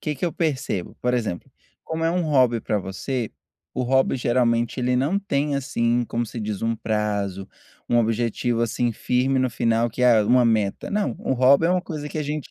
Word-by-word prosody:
que 150 - -2
que 145 - -4
eu 170 - -1
percebo? 135 - -2
Por 125 0 +1
exemplo, 110 -8 -3 0.3
como 160 0 -3
é 165 - +2
um 180 +1 0
hobby 130 -7 +3
pra 105 -1 -1
você, 110 +5 -4 0.4
o - - -1
hobby 130 +2 +2
geralmente 120 0 +1
ele 125 0 +1
não 145 +10 +1
tem, 145 -7 -1
assim, 120 -3 0
como 120 +1 -2
se 115 - -7
diz, 105 -1 -4
um 115 0 +1
prazo, 105 -3 -2 0.4
um 120 - +2
objetivo, 115 +1 0
assim, 120 +1 0
firme 125 +4 0
no 130 -1 +1
final, 115 0 +1
que 125 - -4
é 120 -3 +6
uma 125 +4 +4
meta. 110 -4 0
Não, 200 - 0
o - - -2
hobby 135 +5 +5
é - - +2
uma 180 0 +1
coisa 150 -5 -6
que 155 - -5
a - - 0
gente 150 -1 -4
125 Hz, 205 wpm, -23 LUFS, 115-140 Hz, 0.4 s, é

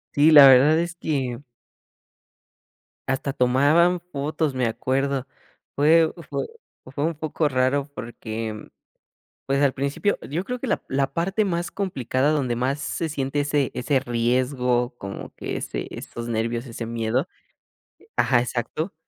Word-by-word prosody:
Sí, 150 +3 +6
la 145 -2 +10
verdad 140 +5 +6
es 170 0 -2
que 130 -7 -2 1.7
hasta 135 +1 -1
tomaban 145 +8 +3
fotos, 150 0 -1
me 125 -1 +1
acuerdo. 135 +3 -1 0.5
Fue 160 +3 +4 0.2
fue - - -2 0.5
fue 145 - -2
un 165 0 0
poco 155 0 -1
raro 130 +1 +1
porque, 110 -2 -6 0.8
pues 135 +1 +1
al 140 - +4
principio 140 +10 -1
yo 165 +6 -2
creo 250 +4 -4
que 270 - -3
la 220 - 0
la 135 0 0
parte 190 +7 0
más 175 -3 -2
complicada 145 - -1
donde 130 -6 0
más 135 +4 -1
se 165 +2 -3
siente 140 0 -2
ese 145 -1 +1
ese 135 +2 +1
riesgo, 125 0 0
como 100 0 -7
que - - -5
ese - - -5
esos 120 0 -7
nervios, 115 +2 -2
ese 115 -1 -6
miedo 115 +5 -1 0.9
ajá, 125 -3 +3
exacto, 125 - -3
135 Hz, 140 wpm, -24 LUFS, 125-155 Hz, 1.7 s, la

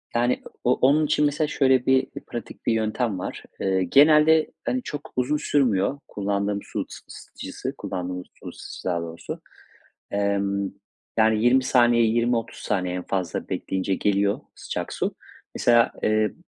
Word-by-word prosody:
Yani 120 +1 +2 0.2
o 125 - +4
onun 145 +4 +4
için 150 0 +2
mesela 150 +1 +1
şöyle 130 -3 +3
bir 130 0 +3 0.2
pratik 120 - -8
bir - - +3
yöntem 110 -2 -1
var. - - -5 0.2
Eee, 95 -1 +1
genelde 150 - +5
hani 255 0 -1
çok 150 -6 -7
uzun 130 +4 +1
sürmüyor 135 -3 +1
kullandığım 100 0 -1
su - - -4 0.2
ısıtıcısı, - - -7
kullandığımız 90 -1 -5
su - - -11
ısıtıcısı - - -10
daha 85 -1 0
doğrusu, 85 0 -7 0.7
emm, 100 -1 0 0.5
yani 110 0 +3
20 130 +2 +5
saniye, 120 -2 +4
20-30 115 +1 0
saniye 90 -3 -1
en 90 - -3
fazla 90 -4 -2
bekleyince 95 0 -1
geliyor 100 0 +1
sıcak - - -5
su. - - -2 0.4
Mesela, 120 -1 +4
eee, - - +2 0.2
b - - -19
115 Hz, 145 wpm, -24 LUFS, 100-130 Hz, 0.7 s, genelde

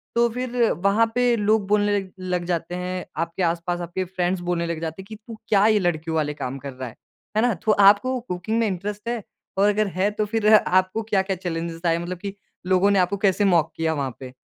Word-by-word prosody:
तो 235 0 +4
फिर 250 +1 -4 0.3
वहाँ 205 +3 +4
पे 245 -1 +3
लोग 210 -1 +1
बोलने 205 0 +2
ल 190 - -8 0.2
लग 180 -1 0
जाते 170 0 -2
हैं। 180 0 -4 0.2
आपके 170 +2 -2
आसपास 170 +1 -1
आपके 175 +2 -3
फ्रेंड्स 180 0 -1
बोलने 170 -1 0
लग 165 -1 -3
जाते 165 +3 -4
हैं, 190 - -13
कि 220 - -8
तू 220 +1 -11
क्या 205 -1 +4
ये 215 -1 +4
लड़कियों 165 -3 -1
वाले 150 -2 0
काम 135 -2 -5
कर 140 0 -7
रहा 130 -1 -6
है, - - -16 0.4
है - - +4
ना? 245 0 +3
तो 205 +4 0
आपको 205 +6 +5
कुकिंग 220 0 -3
में 230 - +2
इंटरेस्ट 205 +3 -4
है? 235 -1 -2 0.4
और 200 +2 +4
अगर 210 0 +1
है 190 +2 +2
तो 210 0 -1
फिर 215 0 +2
आपको 185 +2 +2
क्या-क्या 195 -3 0
चैलेंजेज़ 165 -2 -4
आए? 165 - +3
मतलब 175 +2 -5
कि 195 +2 -6 0.3
लोगों 185 +2 +4
ने 195 - +3
आपको 180 +3 +1
कैसे 200 +1 +2
मॉक 175 -5 +3
किया 160 0 0
वहाँ 135 -4 -3
पे? 130 -1 -9
190 Hz, 230 wpm, -23 LUFS, 170-210 Hz, 0.4 s, आपको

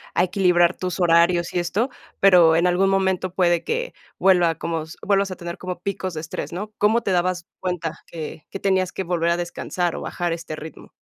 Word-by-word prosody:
a 175 - +4
equilibrar 180 -1 +3
tus 180 0 -4
horarios 170 +1 +3
y 180 - +1
esto, 200 +9 0 0.3
pero 175 -4 +6
en 170 +2 +3
algún 185 +2 +2
momento 190 -1 +1
puede 175 -2 +2
que 485 +2 -2 0.2
vuelva 175 -3 +4
como 165 -1 -3 0.2
vuelvas 200 -1 +2
a 185 - -4
tener 170 -1 -7
como 180 -1 -6
picos 190 -1 -3
de 155 - -4
estrés, 165 - -6
¿no?, 205 +5 -5
¿cómo 220 +3 +3
te 195 - -2
dabas 180 -1 0
cuenta 175 -3 -3
que 155 -2 -8
que 195 - -6
tenías 190 -2 +1
que 190 - -4
volver 170 -1 0
a 170 - +2
descansar 175 0 -2
o - - -5
bajar 175 -2 -2
este 165 -2 -6
ritmo? 155 +1 -11
180 Hz, 200 wpm, -22 LUFS, 170-190 Hz, 0.3 s, pero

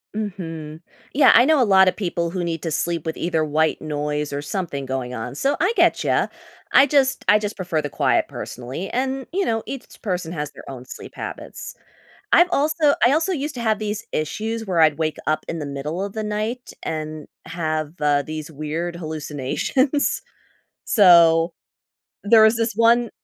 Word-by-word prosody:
Mhm. 165 -7 -5 0.3
Yeah, 275 0 +6
I 240 - +7
know 310 -2 +4
a - - +6
lotta 190 -2 +6
people 170 -4 -3
who 180 -1 -3
need 165 -2 -3
to 165 - -2
sleep 165 +1 -2
with 160 - -3
either 165 -2 0
white 155 +1 +1
noise 150 -1 -3
or 140 - -2
something 145 -3 -4
going 130 -2 -3
on, 110 +3 -5
so 275 - +1
I 365 +7 +2
get 345 -3 +3
ya. - - +1 0.5
I 280 - +7
just 270 -2 +2
I 210 - +6
just 210 0 -4
prefer 175 -4 -2
the 145 - -4
quiet - - +1
personally, 130 +10 -6
and, 265 +1 -2
you 390 +2 0
know, 225 -1 0
each 270 -2 -8
person 180 -5 -3
has 150 -3 -4
their - - -13
own 130 -2 -8
sleep - - -10
habits. - - -7 0.6
I've 350 +1 +6
also 305 -1 +2
I 260 - +4
also 325 +5 +1
used 295 -3 -3
to - - -4
have 220 -2 +1
these 215 +1 -4
issues 220 +9 -3
where 175 -4 +1
I'd 155 -1 +4
wake 155 -1 -1
up 155 0 0
in 165 - -4
the 150 - -4
middle 145 +6 -4
of 200 0 -5
the 220 - -3
night 215 +4 -3
and 155 -1 -5 0.2
have, 155 -2 -3
uh, 145 -1 +2
these, 155 +1 -6
weird 160 +3 -4
hallucinations. 160 - -1 0.6
So 170 -4 +6 0.7
there 220 +1 +6
was 220 +1 +5
this 230 0 0
one 230 +1 +3
175 Hz, 185 wpm, -22 LUFS, 155-230 Hz, 0.7 s, I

